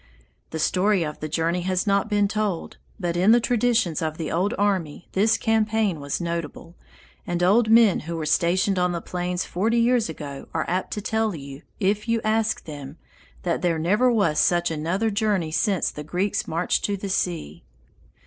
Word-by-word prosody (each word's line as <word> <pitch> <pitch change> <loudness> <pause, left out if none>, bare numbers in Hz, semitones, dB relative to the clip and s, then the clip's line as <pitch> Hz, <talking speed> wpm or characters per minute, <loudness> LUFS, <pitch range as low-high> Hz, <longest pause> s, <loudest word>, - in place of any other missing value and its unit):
The 160 - -5
story 185 +4 +2
of 150 0 -6
the 155 - -5
journey 165 +3 0
has 185 +1 0
not 200 +1 +1
been 205 -1 +2
told, 210 -4 -3 0.2
but 175 -3 -2
in 190 +6 +5
the 240 - +5
traditions 235 -8 +1
of 155 -1 -2
the 160 - -4
old 185 +5 0
army 185 -6 -1
this 215 +4 +3
campaign 220 -5 +1
was 140 0 -3
notable, 170 0 -5 0.5
and 175 0 -1
old 215 +5 +4
men 225 -3 +6
who 170 +2 -6
were 160 -2 -3
stationed 185 +4 +2
on 180 0 +1
the 170 - -2
plains 180 0 -3
forty 220 +6 0
years 235 -3 +2
ago 145 -3 -7
are 160 - 0
apt 185 +2 -1
to 210 - -4
tell 220 -2 0
you, 140 -1 -9 0.2
if 205 +2 0
you 230 0 +2
ask 220 +1 0
them, 145 -1 -8 0.5
that 170 -2 -1
there 170 -2 +1
never 210 +10 +2
was 195 -10 +2
such 175 -1 +2
another 170 +8 -1
journey 200 -6 0
since 195 +2 +1
the 150 - -7
Greeks 185 +6 -1
marched 165 - 0
to 200 -1 -1
the 200 - -5
sea.... 165 - -2
185 Hz, 185 wpm, -24 LUFS, 165-215 Hz, 0.5 s, men